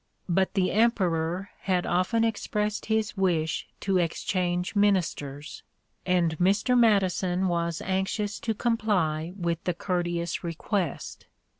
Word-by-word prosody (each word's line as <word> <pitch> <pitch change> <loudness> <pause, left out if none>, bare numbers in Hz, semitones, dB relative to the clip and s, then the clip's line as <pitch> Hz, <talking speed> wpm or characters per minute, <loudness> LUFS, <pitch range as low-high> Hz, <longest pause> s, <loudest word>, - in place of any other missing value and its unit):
But 190 +2 +1
the 185 -2 +2
Emperor 185 -5 +1
had 185 -2 0
often 185 +6 +1
expressed 210 -1 -1
his 220 -1 0
wish 170 -5 0
to 195 -2 +1
exchange 180 +2 -1
ministers, 165 -8 0 0.5
and 175 -3 +2
Mr. 200 +7 +3
Madison 190 -5 +3
was 170 -1 -1
anxious 195 +2 -1
to 225 -1 -2
comply 185 -9 0
with 170 -3 -2
the 180 - 0
courteous 175 -2 -2
request. 175 +3 -3
185 Hz, 115 wpm, -27 LUFS, 170-205 Hz, 0.5 s, Mr